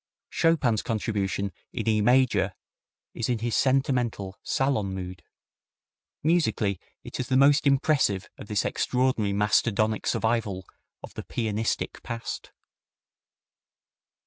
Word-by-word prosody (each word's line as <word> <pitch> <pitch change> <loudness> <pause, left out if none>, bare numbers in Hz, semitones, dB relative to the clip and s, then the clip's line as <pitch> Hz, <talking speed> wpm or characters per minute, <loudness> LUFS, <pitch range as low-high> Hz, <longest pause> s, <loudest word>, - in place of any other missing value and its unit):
Chopin's 140 -10 +2
contribution 100 -3 -2 0.2
in - - -4
E 110 -1 +3
major 125 +2 +3 0.6
is 115 - -3
in 120 - +1
his 115 0 -2
sentimental, 125 -7 +1
salon 110 -8 0
mood. 90 -2 -6 1.0
Musically, 145 - +1 0.2
it - - -7
is 130 - -2
the 130 - +2
most 140 +2 +5
impressive 135 -8 +2
of - - -11
this 105 -1 0
extraordinary 125 -5 +1
mastodonic 105 +1 +1
survival 110 -5 0 0.4
of - - -9
the - - -5
"pianistic" 110 -1 -2
past. 115 -1 -6
115 Hz, 110 wpm, -26 LUFS, 100-130 Hz, 1.0 s, most